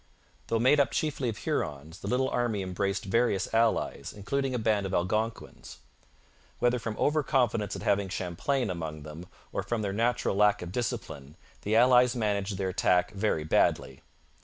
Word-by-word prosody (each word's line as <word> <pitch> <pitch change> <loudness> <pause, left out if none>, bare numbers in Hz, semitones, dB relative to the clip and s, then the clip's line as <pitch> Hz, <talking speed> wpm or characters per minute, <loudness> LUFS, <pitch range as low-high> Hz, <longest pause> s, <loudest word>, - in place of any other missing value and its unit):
Though 115 - +1
made 130 +6 +4
up 140 -4 +3
chiefly 140 -5 -1
of 105 - -5
Hurons, 75 +4 -3
the 100 - -7
little 125 +4 +1
army 115 -6 -1
embraced 95 +2 -2
various 100 -2 +1
allies, 115 0 +1
including 135 +6 -2
a - - +1
band 110 -3 +1
of 95 - -2
Algonquins. 110 +6 -3 0.8
Whether 120 0 +1
from 110 -1 -4
over 150 +1 +2
confidence 120 -8 0
at - - -7
having 100 -1 +1
Champlain 100 +7 -1
among 80 -4 -5
them 80 +4 -9 0.2
or - - -2
from 115 -2 -2
their 100 -1 -2
natural 115 -1 0
lack 105 -1 +3
of 90 - -7
discipline, 75 - -4 0.2
the 105 +2 0
allies 125 +1 +5
managed 105 -3 -1
their 95 -1 -1
attack 90 +2 +2
very 100 -6 -1
badly. 65 -3 +1
105 Hz, 165 wpm, -28 LUFS, 95-120 Hz, 0.8 s, allies